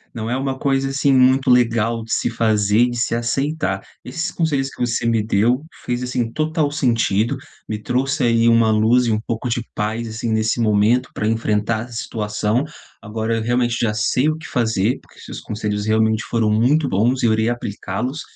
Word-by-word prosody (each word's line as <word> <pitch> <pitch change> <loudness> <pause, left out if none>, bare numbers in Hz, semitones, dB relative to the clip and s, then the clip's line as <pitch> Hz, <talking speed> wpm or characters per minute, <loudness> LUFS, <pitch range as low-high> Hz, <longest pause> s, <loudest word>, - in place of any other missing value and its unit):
não 110 -1 -4
é 125 - 0
uma 135 0 -2
coisa, 135 0 0
assim, 140 0 +2
muito 130 +1 +4
legal 115 -2 +2
de 115 - -10
se - - +1
fazer 110 0 +2
de 120 - -5
se 115 - 0
aceitar. 135 +7 -1 0.2
Esses 170 +2 -4
conselhos 145 -6 0
que - - -16
você 120 -1 -1
me 115 -1 +2
deu, 115 +5 +1 0.2
fez, 120 0 -2
assim, 125 -2 -2
total 155 +1 0
sentido, 115 -6 +1 0.3
me 110 - -2
trouxe 130 +4 -1
aí 115 0 +3
uma 115 -1 +4
luz 110 +4 +3
e 115 - +1
um 105 - +1
pouco 115 +2 -4
de 120 0 -1
paz, 110 +2 -2
assim, 110 +1 -4
nesse 110 +2 0
momento, 110 +3 +2
pra 105 - -2
enfrentar 110 0 0
essa 125 - -13
situação, 105 +1 -1 0.4
agora 110 +1 -3
eu 110 - -2
realmente 120 0 +1
já 110 -3 +1
sei 110 +6 +1
o 155 - +1
que 160 - -10
fazer, 110 -1 0
porque - - -21
seus - - -8
conselhos 105 -1 -3
realmente 110 0 +2
foram 115 -2 0
muito 130 +8 +2
bons, 120 +7 +1
e - - +3
eu 110 - +3
irei 110 +1 +1
aplicá-los, 120 +4 -4
115 Hz, 195 wpm, -20 LUFS, 110-125 Hz, 0.4 s, muito